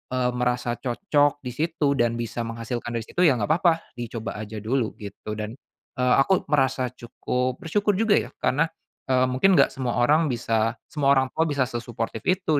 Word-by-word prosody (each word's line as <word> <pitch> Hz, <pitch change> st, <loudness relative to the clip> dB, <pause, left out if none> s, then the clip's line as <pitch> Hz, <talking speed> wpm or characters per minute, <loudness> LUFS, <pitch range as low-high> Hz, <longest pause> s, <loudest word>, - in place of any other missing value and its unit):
eee, 125 Hz, -1 st, +1 dB
merasa 125 Hz, -1 st, 0 dB
cocok 145 Hz, +2 st, +1 dB
di 125 Hz, -, -4 dB
situ 155 Hz, 0 st, 0 dB
dan 120 Hz, -1 st, +2 dB
bisa 120 Hz, 0 st, -4 dB
menghasilkan 115 Hz, +1 st, -4 dB
dari 115 Hz, -, -2 dB
situ, -, -, -7 dB
ya 140 Hz, -, +4 dB
gak 100 Hz, -, 0 dB
papa, 170 Hz, -1 st, +5 dB, 0.3 s
dicoba 115 Hz, -1 st, -5 dB
aja 110 Hz, 0 st, -6 dB
dulu 120 Hz, 0 st, -1 dB
gitu, 105 Hz, +1 st, -8 dB
dan, 105 Hz, +2 st, -5 dB, 0.4 s
eee, 125 Hz, 0 st, +4 dB
aku 190 Hz, +6 st, +2 dB
merasa 130 Hz, -3 st, +2 dB
cukup 125 Hz, +1 st, -3 dB
bersyukur 205 Hz, +5 st, +1 dB
juga 220 Hz, +1 st, +3 dB
ya, 115 Hz, +2 st, -5 dB
karena, 155 Hz, +5 st, +2 dB, 0.4 s
eee, 130 Hz, -1 st, +3 dB
mungkin 180 Hz, +10 st, +4 dB
gak 140 Hz, -, +5 dB
semua 130 Hz, -2 st, -2 dB
orang 150 Hz, +6 st, +4 dB
bisa 115 Hz, -1 st, 0 dB, 0.2 s
semua 140 Hz, -2 st, +3 dB
orang 130 Hz, 0 st, +3 dB
tua 160 Hz, -, +2 dB
bisa 140 Hz, -3 st, +1 dB
sesuportif 120 Hz, -2 st, -4 dB
itu 180 Hz, -5 st, +2 dB
125 Hz, 180 wpm, -25 LUFS, 120-145 Hz, 0.4 s, papa